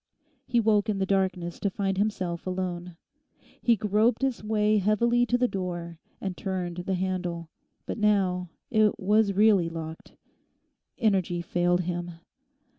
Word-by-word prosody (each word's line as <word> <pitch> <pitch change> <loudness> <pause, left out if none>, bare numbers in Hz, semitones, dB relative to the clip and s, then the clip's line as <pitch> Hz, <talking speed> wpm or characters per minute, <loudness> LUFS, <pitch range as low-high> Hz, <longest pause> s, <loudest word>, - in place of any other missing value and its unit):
He 240 -1 +2
woke 215 -1 +2
in 205 - 0
the 190 - 0
darkness 185 -3 -1
to 200 - 0
find 195 0 -2
himself 185 -5 -2
alone. 180 -2 -4 0.6
He 235 - +4
groped 215 +4 +1
his 265 -5 -1
way 215 0 +2
heavily 235 +5 +2
to 245 - +2
the 250 0 +2
door 175 -5 -5 0.2
and 190 -2 -4
turned 180 -3 -3
the 180 +2 -2
handle. 180 -3 -3 0.4
But - - -4
now 190 -4 +2 0.2
it 215 -3 +3
was 205 +1 +3
really 200 -4 +4
locked. 160 -1 -8 0.8
Energy 185 -6 +1
failed 175 +1 +1
him. 175 0 -4
190 Hz, 140 wpm, -27 LUFS, 175-215 Hz, 0.8 s, He